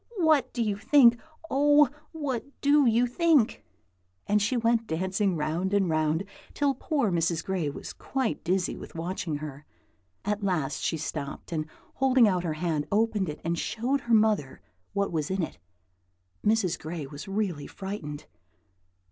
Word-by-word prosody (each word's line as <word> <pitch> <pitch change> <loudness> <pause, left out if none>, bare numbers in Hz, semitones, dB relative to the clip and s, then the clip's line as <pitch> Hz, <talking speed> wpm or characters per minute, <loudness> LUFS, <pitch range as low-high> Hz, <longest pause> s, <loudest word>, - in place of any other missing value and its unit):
What 310 -7 +3
do 240 - -1
you 205 -2 -1
think? 240 0 +5 0.3
oh, 290 0 +5 0.2
what 285 -7 -3 0.2
do 285 -1 +5
you 235 +2 +4
think?" 285 -1 +2 0.6
and 210 0 +2
she 230 +5 +1
went 230 -1 +2
dancing 190 +3 0
round 165 +6 -1
and 195 -4 +2
round, 155 +2 +1 0.3
till 285 -1 +2
poor 270 - 0
Mrs. 165 -1 0
Gray 185 -6 -1
was 140 - -7
quite 265 -4 -2
dizzy 180 +1 0
with - - -11
watching 165 -1 -3
her. 145 -1 -7 0.6
At 210 +1 -1
last 155 -8 -1
she 160 - 0
stopped, 150 0 -5
and 155 -2 -2 0.3
holding 260 -3 +4
out 180 -3 +1
her 165 -3 -1
hand, 155 -2 -1
opened 210 -3 +1
it 150 - -7
and 170 0 -1
showed 255 +5 -1
her 235 - -1
mother 210 -11 +2 0.3
what 200 0 0
was 155 -3 -1
in 190 -1 0
it. - - -6 0.8
Mrs. 210 -5 +2
Gray 160 -2 -5
was 145 +7 -9
really 195 -7 -2
frightened. 190 -7 -6
200 Hz, 155 wpm, -27 LUFS, 160-235 Hz, 0.8 s, think